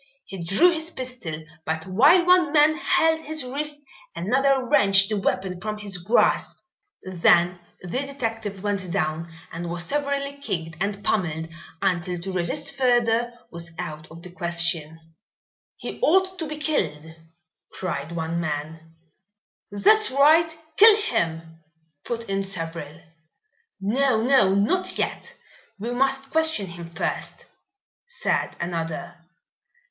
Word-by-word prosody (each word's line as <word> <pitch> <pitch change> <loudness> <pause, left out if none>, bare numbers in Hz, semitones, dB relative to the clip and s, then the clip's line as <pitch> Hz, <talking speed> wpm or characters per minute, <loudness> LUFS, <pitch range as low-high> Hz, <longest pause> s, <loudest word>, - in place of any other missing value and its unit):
He 190 -3 -7
drew 200 - +4
his 325 -1 -3
pistol, 250 - -6 0.2
but 160 0 -3
while 285 - +5
one 360 -4 +4
man 305 0 +5
held 320 0 +2
his 315 -1 -2
wrist 290 +3 -3 0.4
another 260 +9 +1
wrenched 195 -2 +5
the 215 - -1
weapon 185 -2 -2
from 215 +1 -4
his 200 -3 -4
grasp. 200 +8 +2 0.5
Then 175 -1 +3 0.2
the 180 +8 -3
detective 225 -8 -4
went 200 -3 -2
down 160 0 -2 0.2
and 170 +1 -5
was 175 0 -1
severely 280 +1 -2
kicked 170 - -4
and 200 0 -2
pummelled, 160 -5 -1 0.3
until 180 -2 0
to 190 +3 -5
resist 175 -2 -2
further 240 -2 +2 0.2
was 170 0 -6
out 155 -3 -6
of 165 +1 -12
the 180 - -9
question. 170 -3 0 0.8
"He - - -7
ought 375 +2 +2
to 320 - -3
be 305 0 -6
killed!" 180 - -1 0.7
cried 165 -4 -4
one 165 0 -3
man. 160 +1 -5 0.7
"That's 430 - +4
right, 315 +4 +4 0.2
kill 435 +1 +9
him!" 165 - -2 0.5
put 235 -1 -4
in 195 0 -1
several. 165 -4 -4 0.8
"No! 230 +4 +1
no! 225 -5 +4
not 210 - +1
yet. - - -3 0.4
We 225 +4 -4
must 270 +2 0
question 320 -10 +2
him 170 -1 -9
first," 165 -1 -4 0.6
said 480 0 -2
another. 170 0 -4
195 Hz, 130 wpm, -24 LUFS, 170-275 Hz, 0.8 s, kill